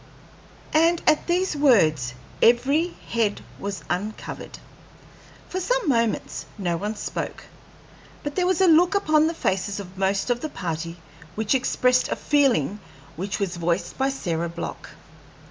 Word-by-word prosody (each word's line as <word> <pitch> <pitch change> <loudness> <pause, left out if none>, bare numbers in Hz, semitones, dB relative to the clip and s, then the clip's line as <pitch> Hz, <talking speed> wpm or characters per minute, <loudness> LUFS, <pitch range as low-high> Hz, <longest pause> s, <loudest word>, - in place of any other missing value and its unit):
And 330 +2 +4
at 310 -1 +3
these 360 0 +1
words 155 - +3 0.3
every 275 +8 +4 0.2
head 225 -3 0 0.2
was 200 -1 -5
uncovered. 205 +5 -4 0.9
For 370 - -3
some - - 0
moments 230 -5 0
no 175 -4 -1
one 210 +5 -3
spoke; - - -5 0.8
but 290 - -3
there 360 +1 +1
was 370 -1 +2
a 380 - +6
look 345 +4 +5
upon 310 -5 +3
the 330 - -2
faces 195 - -1
of 190 -1 -9
most 195 +4 +1
of 240 - 0
the 310 - -3
party 165 - -4 0.4
which 220 +2 +1
expressed 255 -1 +2
a - - 0
feeling 240 - +2 0.4
which 190 +6 -3
was 190 -3 -2
voiced 170 +1 -1
by 270 +1 +2
Sarah 170 -10 -2
Block. 170 0 -6
230 Hz, 145 wpm, -24 LUFS, 185-310 Hz, 0.9 s, a